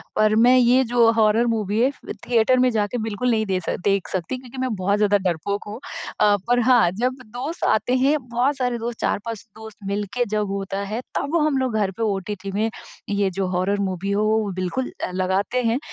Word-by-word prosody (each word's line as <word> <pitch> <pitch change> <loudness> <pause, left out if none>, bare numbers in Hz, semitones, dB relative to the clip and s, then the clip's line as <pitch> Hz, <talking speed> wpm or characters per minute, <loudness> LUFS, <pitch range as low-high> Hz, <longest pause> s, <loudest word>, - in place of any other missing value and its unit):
पर 215 0 +3
मैं 245 +3 +6
ये 250 +1 +5
जो 235 -2 +4
हॉरर 225 +1 +3
मूवी 215 -2 0
है 255 - +4
फ़ - - -11 0.2
थिएटर 245 +2 +3
में 255 - +4
जाके 215 +2 -1
बिल्कुल 225 +3 -1
नहीं 220 -1 +1
दे 190 -2 0
स - - -1
देख 195 -2 +1
सकती, 190 +8 -3
क्योंकि 255 0 -12
मैं 255 -3 -1
बहुत 200 +2 0
ज़्यादा 205 -1 +3
डरपोक 190 +5 -3
हूँ। 210 +3 -7 0.4
अ, 205 -1 +5
पर 245 0 +3
हाँ 240 -8 +5
जब 245 +7 -1
दोस्त 250 +10 -6
आते 245 +3 +2
हैं, 275 +4 +3
बहुत 250 +4 +1
सारे 250 -2 -1
दोस्त 235 0 -5
4-5 225 +1 -2
दोस्त 220 -1 -11
मिल 205 +1 -1
के 245 -1 +1
जब 210 -1 0
होता 195 0 -3
है 230 - -2
तब 285 +4 -1
हम 295 -3 +1
लोग 260 -3 -1
घर 200 -3 +1
पे 230 - -1
ओटीटी 200 -1 -3
में, 215 +3 0 0.4
ये 200 -1 +1
जो 190 0 -2
हॉरर 185 +3 0
मूवी 195 0 -2
हो 205 +1 +1
वो 215 -1 +1
बिल्कुल 185 +8 -3
अ, - - -2
लगाते 190 +7 0
हैं, 230 +2 +1
220 Hz, 215 wpm, -22 LUFS, 200-245 Hz, 0.4 s, मैं